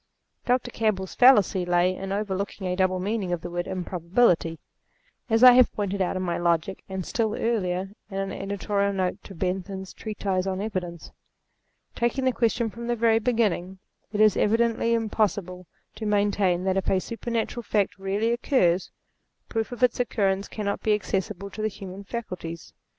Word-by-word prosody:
Dr. 245 0 +1
Campbell's 200 -5 -1
fallacy 210 -7 +5
lay 175 +1 +2
in 195 +1 -6
overlooking 200 -1 -3
a 180 0 0
double 185 0 +1
meaning 200 -1 -2
of 175 -2 -1
the 175 - -6
word 175 0 -3
improbability; 180 -1 +1 0.7
as 225 +2 +3
I 250 - +12
have 250 0 +6
pointed 200 -1 -2
out 185 - 0
in 185 - -2
my 175 -2 -1
Logic, 170 +2 0
and, 190 -2 -4
still 220 -2 -1
earlier, 190 -4 -1 0.2
in 195 - -5
an 195 0 -2
editorial 200 0 -1
note 185 -2 -2
to 195 - -10
Bentham's 190 +2 -3
treatise 195 -3 -2
on 190 0 -2
Evidence. 185 -5 -4 0.8
Taking 240 +3 0
the 260 - +4
question 230 -1 0
from 235 +1 -7
the 240 - +1
very 225 -1 +3
beginning; 210 -6 0 0.3
it 210 - -3
is 215 -2 +6
evidently 230 +1 +2
impossible 205 -5 -1 0.3
to 215 0 -4
maintain 200 -3 +2
that 190 0 +1
if 195 - 0
a 190 - +3
super 230 +5 -6
natural 235 +1 -1
fact 205 -3 0
really 200 +4 0
occurs, 215 - +2 0.6
proof 225 0 -2
of 245 0 -4
its 250 -1 +3
occurrence 200 -5 0
cannot 200 -2 -3
be 215 -1 +3
accessible 200 -1 -3
to 215 - -6
the 215 - +1
human 195 -1 -8
faculties. 185 -7 -6
200 Hz, 170 wpm, -26 LUFS, 185-225 Hz, 0.8 s, I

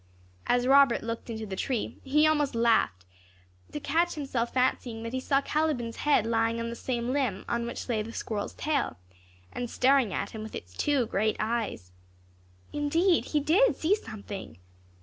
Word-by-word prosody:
As 245 0 +2
Robert 275 -2 +5
looked 230 +1 -5
into 220 -1 -4
the 195 -2 -5
tree, 240 +3 -2
he 300 +3 +3
almost 295 -4 +2
laughed 225 - +2 0.7
to - - -4
catch 335 +5 +1
himself 260 -5 -2
fancying 250 -3 0
that 230 +1 -5
he 260 - 0
saw 275 +1 +2
Caliban's 285 -7 -1
head 295 -7 +3
lying 230 0 +1
on 230 0 -3
the - - -5
same 240 0 -2
limb 255 -9 -1
on 235 0 -1
which 235 - -6
lay 230 -4 0
the 220 +2 -6
squirrel's 215 -2 -4
tail, 290 - -1 0.6
and 245 -1 -4
staring 260 -4 +3
at - - -3
him 220 - -7
with 220 - -7
its 90 +1 -8
two 280 - +1
great 215 0 0
eyes. 215 - -2 0.8
Indeed 325 +5 +2
he 300 - 0
did 355 - +4
see 330 +5 +2
something. 205 - -6
240 Hz, 170 wpm, -28 LUFS, 225-285 Hz, 0.8 s, Robert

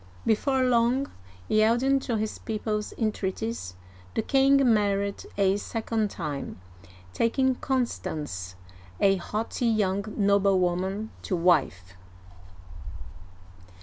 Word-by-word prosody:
Before 260 +4 +2
long, 250 +2 +2 0.4
yielding 235 +6 +3
to 240 -4 -2
his 215 0 -3
people*s 215 -1 -3
entreaties, 215 - -3 0.4
the - - 0
king 275 0 +4 0.2
married 200 -1 0
a 195 0 +3
second 220 0 -2
time, 145 - -5 0.5
taking 260 - +2
Constance, 155 - -3 0.4
a 195 -1 +4
haughty 220 +5 -2
young 200 -3 +1
noblewoman, 195 0 +1
to 190 - -2
wife. 140 - +1
210 Hz, 90 wpm, -27 LUFS, 190-235 Hz, 0.5 s, king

